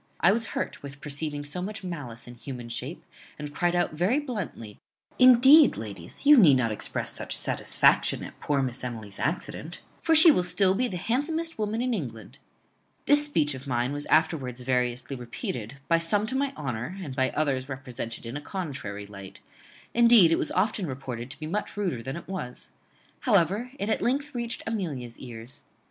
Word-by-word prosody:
I 175 Hz, -, +5 dB
was 225 Hz, +2 st, 0 dB
hurt -, -, -3 dB
with 140 Hz, 0 st, -9 dB
perceiving 145 Hz, 0 st, -4 dB
so 145 Hz, +5 st, -3 dB
much 205 Hz, +2 st, -5 dB
malice 145 Hz, -10 st, -6 dB
in 120 Hz, -, -9 dB
human 120 Hz, -1 st, -8 dB
shape, 130 Hz, +7 st, -5 dB, 0.3 s
and 150 Hz, -1 st, -7 dB
cried 175 Hz, +3 st, +1 dB
out 175 Hz, -2 st, +1 dB
very 180 Hz, -, +1 dB
bluntly, 205 Hz, -, -5 dB, 0.4 s
Indeed, 265 Hz, +4 st, +8 dB
ladies, 100 Hz, -, -7 dB
you 295 Hz, +1 st, +9 dB
need 155 Hz, -, +7 dB
not 115 Hz, -3 st, 0 dB
express 105 Hz, -, -3 dB
such -, -, -1 dB
satisfaction -, -, +3 dB
at -, -, -10 dB
poor 140 Hz, -2 st, 0 dB
Miss 125 Hz, -1 st, -4 dB
Emily's 110 Hz, -5 st, -6 dB
accident; 155 Hz, +5 st, -3 dB, 0.2 s
for 325 Hz, -1 st, +3 dB
she 320 Hz, +1 st, +10 dB
will 180 Hz, -, +2 dB
still 180 Hz, +2 st, +3 dB
be 250 Hz, +6 st, +1 dB
the 185 Hz, -, -4 dB
handsomest 315 Hz, -, -1 dB
woman 215 Hz, +2 st, -1 dB
in 250 Hz, -1 st, 0 dB
England. 115 Hz, -, -6 dB, 0.7 s
This 290 Hz, +1 st, +5 dB
speech 150 Hz, -, +1 dB
of 130 Hz, +1 st, -9 dB
mine 125 Hz, +1 st, 0 dB
was 145 Hz, 0 st, -4 dB
afterwards 145 Hz, -6 st, +1 dB
variously 125 Hz, +1 st, -1 dB
repeated, 120 Hz, 0 st, -6 dB
by 165 Hz, +2 st, +3 dB
some 200 Hz, +6 st, +1 dB
to 250 Hz, +4 st, -4 dB
my 275 Hz, 0 st, 0 dB
honour, 135 Hz, +6 st, -4 dB
and 145 Hz, -9 st, -6 dB
by 130 Hz, -1 st, +2 dB
others 140 Hz, -3 st, 0 dB
represented 125 Hz, -3 st, -6 dB
in 115 Hz, +3 st, -6 dB
a 145 Hz, -, -4 dB
contrary 130 Hz, -, -5 dB
light; 100 Hz, -1 st, -11 dB, 0.5 s
indeed, 235 Hz, -7 st, +7 dB
it -, -, +3 dB
was -, -, 0 dB
often 210 Hz, -3 st, 0 dB
reported 130 Hz, -3 st, -6 dB
to 140 Hz, -, -8 dB
be 155 Hz, -, -5 dB
much 205 Hz, +6 st, -3 dB
ruder 180 Hz, -, -1 dB
than 135 Hz, +6 st, -5 dB
it 170 Hz, -, -10 dB
was. 170 Hz, -10 st, -6 dB, 0.5 s
However, 205 Hz, -, +2 dB
it 200 Hz, -, -3 dB
at 220 Hz, -, 0 dB
length 280 Hz, +4 st, 0 dB
reached 235 Hz, -1 st, -4 dB
Amelia's 150 Hz, -, -4 dB
ears. 120 Hz, -1 st, -9 dB
150 Hz, 185 wpm, -27 LUFS, 125-210 Hz, 0.7 s, she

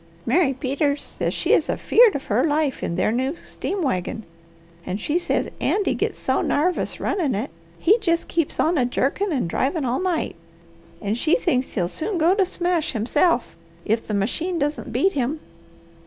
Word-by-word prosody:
Mary 290 Hz, +3 st, +3 dB
Peters 280 Hz, +2 st, -1 dB
says -, -, -2 dB
she -, -, +1 dB
is -, -, +3 dB
afeared 465 Hz, -3 st, +4 dB
of 280 Hz, -, -4 dB
her 225 Hz, +4 st, +1 dB
life 300 Hz, -3 st, 0 dB
in 170 Hz, -, -2 dB
their 185 Hz, +4 st, +1 dB
new 260 Hz, +6 st, -1 dB
steam 380 Hz, +2 st, -4 dB
wagon, 220 Hz, -, -2 dB, 0.6 s
and 185 Hz, +3 st, -4 dB
she 300 Hz, +9 st, 0 dB
says -, -, 0 dB
Andy 410 Hz, -, +1 dB
gits -, -, -2 dB
so -, -, 0 dB
narvous 345 Hz, +5 st, 0 dB
runnin' 325 Hz, -, 0 dB
it, 205 Hz, -4 st, -3 dB, 0.3 s
he 410 Hz, -, +4 dB
jest 335 Hz, -5 st, 0 dB
keeps 330 Hz, -3 st, -1 dB
on 325 Hz, -1 st, +2 dB
a 250 Hz, -, +3 dB
jerkin' 280 Hz, +10 st, 0 dB
and 260 Hz, -, 0 dB
drivin' 275 Hz, -, -1 dB
all 250 Hz, +1 st, 0 dB
night, 360 Hz, -4 st, -1 dB, 0.7 s
and 205 Hz, +1 st, 0 dB
she 320 Hz, +4 st, +3 dB
thinks 265 Hz, -, 0 dB
he'll 180 Hz, -5 st, 0 dB
soon 350 Hz, -, -3 dB
go 335 Hz, +3 st, +4 dB
to 390 Hz, -2 st, +2 dB
smash 350 Hz, -3 st, -1 dB
himself, 245 Hz, -, +1 dB, 0.3 s
if 225 Hz, +2 st, 0 dB
the 210 Hz, -, -1 dB
machine 320 Hz, -, -1 dB
doesn't 295 Hz, 0 st, -2 dB
beat 385 Hz, -, +2 dB
him. 275 Hz, +3 st, -1 dB
295 Hz, 180 wpm, -23 LUFS, 245-345 Hz, 0.7 s, afeared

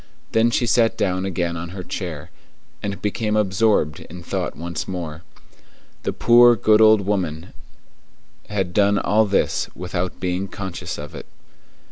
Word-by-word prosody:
Then 115 Hz, +1 st, +3 dB
she 120 Hz, +1 st, +1 dB
sat 115 Hz, -1 st, +2 dB
down 95 Hz, -1 st, 0 dB
again 85 Hz, -2 st, -2 dB
on 85 Hz, +1 st, -5 dB
her 90 Hz, -, -5 dB
chair, 85 Hz, -6 st, -6 dB, 0.5 s
and 100 Hz, -1 st, -4 dB
became 105 Hz, +1 st, -1 dB
absorbed 100 Hz, -6 st, +2 dB
in 90 Hz, +2 st, -11 dB
thought -, -, -3 dB
once 85 Hz, -2 st, -5 dB
more. 85 Hz, -4 st, -5 dB, 0.8 s
The -, -, -2 dB
poor, 120 Hz, 0 st, +6 dB
good 110 Hz, 0 st, +4 dB
old 110 Hz, -1 st, +6 dB
woman 90 Hz, -5 st, -3 dB, 1.0 s
had 95 Hz, -4 st, -2 dB
done 100 Hz, 0 st, +3 dB
all 105 Hz, +2 st, +2 dB
this 100 Hz, -, 0 dB
without 90 Hz, 0 st, -4 dB
being 90 Hz, +1 st, -2 dB
conscious 95 Hz, -2 st, -6 dB
of 75 Hz, -1 st, -8 dB
it. -, -, -9 dB
95 Hz, 145 wpm, -22 LUFS, 85-105 Hz, 1.0 s, poor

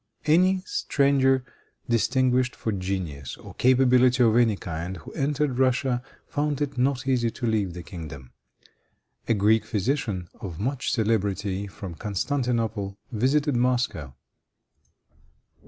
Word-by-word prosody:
Any 185 Hz, +4 st, +4 dB
stranger, 135 Hz, -5 st, +2 dB, 0.4 s
distinguished 125 Hz, +2 st, +2 dB
for 110 Hz, -, -3 dB
genius 90 Hz, -9 st, -4 dB
or -, -, -12 dB
capability 125 Hz, 0 st, +4 dB
of 115 Hz, -2 st, +4 dB
any 120 Hz, -3 st, +4 dB
kind, 90 Hz, 0 st, -5 dB
who 75 Hz, -, -11 dB
entered 140 Hz, -2 st, -1 dB
Russia, 130 Hz, -1 st, +2 dB, 0.2 s
found 145 Hz, -1 st, -1 dB
it 145 Hz, -2 st, -2 dB
not 130 Hz, +1 st, 0 dB
easy 125 Hz, -3 st, +2 dB
to 120 Hz, +2 st, -5 dB
leave 105 Hz, -6 st, 0 dB
the 90 Hz, -, -7 dB
kingdom. 75 Hz, -8 st, -9 dB, 1.0 s
A 115 Hz, -, +3 dB
Greek 105 Hz, +2 st, +3 dB
physician, 105 Hz, -4 st, -1 dB
of 90 Hz, -5 st, -7 dB
much 130 Hz, +5 st, -1 dB
celebrity, 100 Hz, -3 st, 0 dB
from 95 Hz, -2 st, -8 dB
Constantinople, 110 Hz, -, -2 dB
visited 135 Hz, +5 st, +1 dB
Moscow. 120 Hz, -, 0 dB
120 Hz, 120 wpm, -25 LUFS, 100-130 Hz, 1.0 s, Any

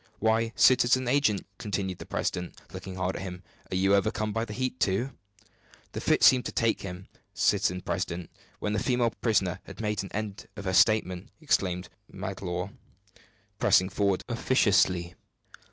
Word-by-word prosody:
"Why, 110 Hz, +1 st, +1 dB
citizen 130 Hz, 0 st, +4 dB
agent!" 125 Hz, -6 st, +2 dB
continued 95 Hz, -3 st, -3 dB
the -, -, -9 dB
president, 90 Hz, 0 st, -3 dB
looking 95 Hz, -1 st, -7 dB
hard 95 Hz, 0 st, -2 dB
at -, -, -5 dB
him, 90 Hz, -1 st, -7 dB, 0.3 s
"are -, -, -1 dB
you 95 Hz, +2 st, +3 dB
overcome 105 Hz, +2 st, +1 dB
by 115 Hz, 0 st, -1 dB
the 105 Hz, -, -7 dB
heat, 130 Hz, +2 st, -2 dB
too?" 105 Hz, +8 st, +1 dB, 0.8 s
"The -, -, -5 dB
fit -, -, +2 dB
seemed 130 Hz, -1 st, +6 dB
to -, -, -3 dB
take 115 Hz, -1 st, +1 dB
him, 90 Hz, 0 st, -7 dB, 0.3 s
citizen 90 Hz, 0 st, +2 dB
president, 85 Hz, -2 st, -3 dB, 0.3 s
when 105 Hz, -, -2 dB
the 110 Hz, -, 0 dB
female 125 Hz, -2 st, +1 dB
prisoner 95 Hz, -7 st, 0 dB
had 95 Hz, -1 st, -11 dB
made 105 Hz, -2 st, -1 dB
an 95 Hz, -, -7 dB
end 105 Hz, -1 st, -5 dB
of 100 Hz, -2 st, -8 dB
her 95 Hz, -, -1 dB
statement," 95 Hz, -3 st, +3 dB
exclaimed 95 Hz, -, 0 dB, 0.2 s
Magloire, 95 Hz, -1 st, -4 dB, 0.9 s
pressing 95 Hz, 0 st, +4 dB
forward 100 Hz, -1 st, 0 dB
officiously. 95 Hz, -7 st, +2 dB
100 Hz, 155 wpm, -28 LUFS, 95-115 Hz, 0.9 s, seemed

